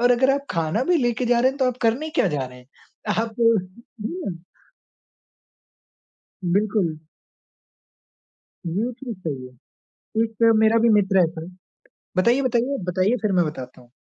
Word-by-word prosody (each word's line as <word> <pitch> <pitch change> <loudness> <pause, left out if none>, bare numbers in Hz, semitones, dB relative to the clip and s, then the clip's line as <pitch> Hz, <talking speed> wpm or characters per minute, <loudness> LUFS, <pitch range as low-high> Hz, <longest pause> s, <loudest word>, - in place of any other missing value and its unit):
और 245 +1 +4
अगर 260 +2 +4
आप 280 0 -4
खाना 165 +7 0
भी 355 -1 +3
लेकर 245 -2 0
जा 240 -1 +4
रहे 260 +2 +4
हैं 270 - -11
तो 265 - +2
आप 250 - -3
करने 255 +8 +1
क्या - - +2
जा 145 -4 -2
रहे 125 0 -13
हैं? 125 - -18 0.6
आप 225 -1 -6
हुँ। 225 - -1 2.1
बिल्कुल। 190 -3 +1 1.7
ये 210 +9 -1
चीज़ 240 -4 -8
सही 140 -8 -5
है। 125 - -15 0.7
एक 230 0 +2
मेरा 220 +1 +4
भी 230 +1 +4
मित्र 195 -3 +4
है 170 - +5
सर। 165 +1 -8 0.7
बताइए, 235 +8 +3
बताइए, 255 +2 +1
बताइए, 185 +6 +1
फिर 210 - +1
मैं 180 -2 +3
बताता 130 -4 -7
हूँ। 120 -1 -20
220 Hz, 155 wpm, -23 LUFS, 175-245 Hz, 2.1 s, है